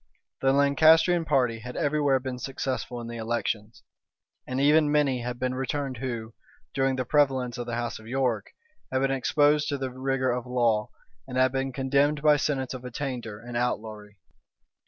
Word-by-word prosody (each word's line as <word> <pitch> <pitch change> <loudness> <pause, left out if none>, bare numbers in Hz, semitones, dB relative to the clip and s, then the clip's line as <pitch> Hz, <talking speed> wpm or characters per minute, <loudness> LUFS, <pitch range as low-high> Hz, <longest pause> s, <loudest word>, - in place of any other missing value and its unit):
The 135 - +3
Lancastrian 160 +5 +4
party 125 -6 +1
had 125 +2 -8
every 150 +1 0
where 135 -2 +3
been 130 -1 -5
successful 130 -2 -4
in 115 - -7
the 120 0 -6
elections; 115 -1 -3 0.6
and 130 +1 -2
even 150 +1 +4
many 140 -4 +2
had 120 +1 -4
been 130 0 -1
returned 135 0 -3
who, 115 -3 -5 0.4
during 135 -1 +1
the 130 -1 -2
prevalence 130 -3 +2
of 120 - -4
the 120 - -3
house 120 -1 -3
of 110 - -14
York, 125 -4 0 0.4
had 130 0 +1
been 135 - +2
exposed 145 +2 +2
to 140 - -1
the 135 -1 -4
rigor 130 0 -1
of 125 0 -3
law, 120 -4 +1 0.4
and 130 -1 -5
had 130 0 +4
been 135 0 -2
condemned 140 +3 +1
by 150 -1 +6
sentence 135 -3 -1
of 130 -1 -7
attainder 125 -4 -5
and 120 +1 -8
outlawry. 110 -4 -3
130 Hz, 175 wpm, -27 LUFS, 120-140 Hz, 0.6 s, by